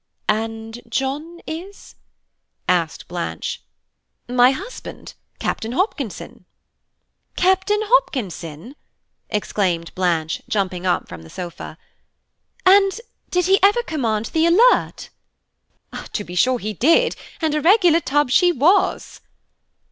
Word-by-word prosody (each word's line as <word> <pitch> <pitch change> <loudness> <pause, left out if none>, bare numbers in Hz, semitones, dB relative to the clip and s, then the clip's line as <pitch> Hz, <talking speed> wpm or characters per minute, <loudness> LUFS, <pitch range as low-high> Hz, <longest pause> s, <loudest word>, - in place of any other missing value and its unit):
"And 225 +2 -2
John 300 +6 -3
is?" 360 +6 -8 0.7
asked 170 -3 0
Blanche. 85 - -4 0.7
"My 245 0 +5
husband, 275 - -7 0.2
Captain 225 +2 -3
Hopkinson." 375 - -3 0.9
"Captain 380 +3 +2
Hopkinson!" 245 - -1 0.5
exclaimed 185 -5 -1
Blanche, 170 -3 -1
jumping 185 -3 -1
up 180 - 0
from 85 -2 -9
the 80 - -14
sofa, 170 - -8 0.9
"and 390 +2 +5 0.3
did 360 -1 +1
he 385 +2 +4
ever 410 +5 +4
command 230 - -2
the 325 +1 +3
Alert? 455 +9 +3 0.5
" - - -13
"To 205 - -2
be 175 - -10
sure 250 +8 +3
he 215 -2 -4
did, 335 - +3 0.2
and 315 -2 0
a 305 - 0
regular 350 -1 +5
tub 290 -3 0
she 355 +6 +5
was!" 345 +6 +1
260 Hz, 110 wpm, -21 LUFS, -, 0.9 s, My